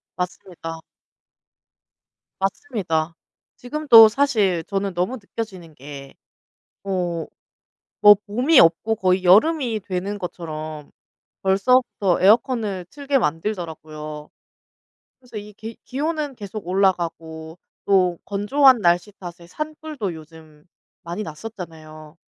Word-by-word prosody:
맞습니다. 175 Hz, -2 st, -6 dB, 1.6 s
맞습니다. 190 Hz, -, -2 dB, 0.4 s
지금도 245 Hz, -4 st, +6 dB
사실 215 Hz, -10 st, +1 dB
저는 195 Hz, +1 st, -3 dB
너무 185 Hz, +9 st, -1 dB
느껴지는 195 Hz, -7 st, -8 dB
게 140 Hz, 0 st, -10 dB, 0.7 s
어 180 Hz, -4 st, -2 dB, 0.8 s
뭐 205 Hz, 0 st, +10 dB
봄이 250 Hz, +9 st, +3 dB
없고 175 Hz, +7 st, +4 dB
거의 185 Hz, -2 st, +1 dB
여름이 230 Hz, -, +4 dB
되는 195 Hz, +2 st, -3 dB
것처럼 155 Hz, -4 st, -7 dB, 0.5 s
벌써부터 195 Hz, -1 st, +2 dB
에어컨을 210 Hz, -2 st, +2 dB
틀게 285 Hz, -1 st, 0 dB
만들더라고요. 155 Hz, -, -4 dB, 0.9 s
그래서 245 Hz, -4 st, -11 dB
이 210 Hz, 0 st, -9 dB
계 220 Hz, +2 st, -9 dB
기온은 300 Hz, +1 st, -3 dB
계속 205 Hz, -3 st, -8 dB
올라가고 170 Hz, -3 st, -1 dB, 0.3 s
또 185 Hz, -3 st, +3 dB
건조한 245 Hz, +5 st, +4 dB
날씨 175 Hz, +2 st, +2 dB
탓에 175 Hz, -1 st, -9 dB
산불도 305 Hz, -, -5 dB
요즘 155 Hz, -1 st, -15 dB, 0.4 s
많이 170 Hz, +4 st, -5 dB
났었잖아요. 155 Hz, -4 st, -9 dB
190 Hz, 235 characters per minute, -22 LUFS, 165-225 Hz, 1.6 s, 뭐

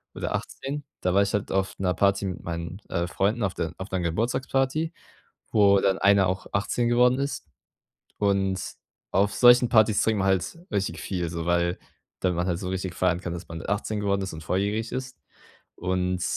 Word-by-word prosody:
oder -, -, -3 dB
18, 145 Hz, +2 st, -5 dB, 0.2 s
da 90 Hz, 0 st, +1 dB
war 100 Hz, -, +5 dB
ich 100 Hz, -, -1 dB
halt 105 Hz, -, -1 dB
auf 95 Hz, 0 st, 0 dB
'ner 90 Hz, -2 st, +1 dB
Party 100 Hz, +1 st, +2 dB
mit 90 Hz, -2 st, -4 dB
meinen, 85 Hz, +3 st, -5 dB
äh, 85 Hz, -1 st, 0 dB
Freunden 105 Hz, +5 st, 0 dB
auf 95 Hz, -, 0 dB
der 80 Hz, -1 st, -2 dB
auf 95 Hz, +1 st, -7 dB
'ner 95 Hz, -, 0 dB
Geburtstagsparty, 130 Hz, -, 0 dB, 0.6 s
wo 100 Hz, -2 st, +5 dB
dann 95 Hz, -1 st, +2 dB
einer 100 Hz, -2 st, +5 dB
auch 95 Hz, +1 st, -3 dB
18 120 Hz, +4 st, 0 dB
geworden 125 Hz, +2 st, +4 dB
ist. 140 Hz, +1 st, -3 dB, 0.7 s
Und 95 Hz, -2 st, +1 dB, 0.5 s
auf 100 Hz, +1 st, +2 dB
solchen 120 Hz, 0 st, +6 dB
Partys 110 Hz, -2 st, +4 dB
trinkt 110 Hz, -2 st, +1 dB
man 95 Hz, -, +1 dB
halt 95 Hz, -, 0 dB
richtig 95 Hz, -4 st, -1 dB
viel 90 Hz, -3 st, -2 dB
so, 85 Hz, -1 st, -4 dB
weil 85 Hz, 0 st, +1 dB, 0.4 s
dann 90 Hz, -2 st, +1 dB
man 90 Hz, +1 st, 0 dB
halt 85 Hz, -1 st, -1 dB
so 90 Hz, -2 st, -4 dB
richtig 95 Hz, -2 st, -3 dB
feiern 90 Hz, -1 st, +1 dB
kann, 85 Hz, -, -4 dB
dass 85 Hz, -1 st, -7 dB
man 80 Hz, -1 st, -7 dB
18 105 Hz, +1 st, -1 dB
geworden 100 Hz, -1 st, +1 dB
ist 95 Hz, -, -5 dB
und 80 Hz, 0 st, -8 dB
volljährig 100 Hz, +6 st, -1 dB
ist. 130 Hz, -5 st, -5 dB, 0.6 s
Und 90 Hz, 0 st, -1 dB
95 Hz, 190 wpm, -26 LUFS, 90-110 Hz, 0.7 s, solchen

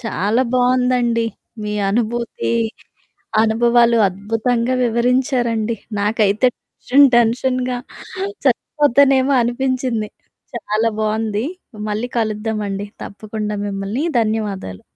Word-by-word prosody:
చాలా 225 Hz, +1 st, 0 dB
బావుందండి. 250 Hz, -2 st, +2 dB, 0.4 s
మీ 210 Hz, 0 st, -3 dB, 0.2 s
అనుభూతి, 235 Hz, +3 st, -1 dB, 0.9 s
అనుభవాలు 235 Hz, +1 st, +3 dB
అద్భుతంగా 225 Hz, +5 st, -1 dB
వివరించారండి. 235 Hz, -1 st, +1 dB, 0.2 s
నాకైతే 210 Hz, +2 st, +2 dB
టెన్షన్, 280 Hz, +3 st, +3 dB
టెన్షన్‌గా 250 Hz, +2 st, +1 dB, 0.7 s
చచ్చిపోతానేమో! 280 Hz, -1 st, +3 dB
అనిపించింది. 245 Hz, -2 st, -1 dB, 0.5 s
చాలా 220 Hz, 0 st, 0 dB
బావుంది. 215 Hz, 0 st, -1 dB, 0.4 s
మళ్ళీ 215 Hz, +4 st, -2 dB
కలుద్దామండి 210 Hz, -2 st, -2 dB, 0.2 s
తప్పకుండా 210 Hz, 0 st, -5 dB
మిమ్మలని. 200 Hz, +8 st, -3 dB, 0.2 s
ధన్యవాదాలు. 205 Hz, -, -3 dB
230 Hz, 75 wpm, -19 LUFS, 215-250 Hz, 0.9 s, అనుభవాలు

